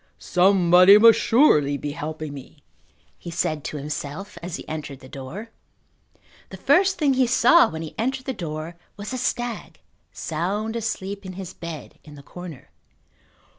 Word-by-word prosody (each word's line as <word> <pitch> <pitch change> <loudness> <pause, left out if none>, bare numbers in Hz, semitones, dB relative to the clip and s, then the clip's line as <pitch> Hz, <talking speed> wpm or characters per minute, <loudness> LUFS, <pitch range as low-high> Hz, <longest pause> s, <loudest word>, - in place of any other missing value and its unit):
"Somebody 180 +1 +5
must 230 +1 +7
surely 150 - +4
be 145 +2 -5
helping 155 -1 -6
me," 135 -2 -12 0.6
he - - -8
said 155 -2 -2
to 150 - -4
himself 150 +6 -6
as 175 -1 -5
he - - -9
entered 150 -3 -6
the 130 - -13
door. 155 - -8 1.0
The - - -9
first 385 +1 +3
thing 290 -4 +2
he 260 -1 +2
saw 255 +7 +5
when 160 0 -6
he 160 - -8
entered 260 +3 -2
the 265 - -2
door 160 -3 -6 0.2
was 205 +3 -6
the 255 - -3
stag 240 -2 -3 0.3
sound 200 +8 -3
asleep 205 -3 -4
in 185 -1 -8
his 185 -1 -8
bed 170 -2 -9
in 150 -1 -13
the 140 - -13
corner. 175 -3 -11
180 Hz, 160 wpm, -23 LUFS, 155-225 Hz, 1.0 s, must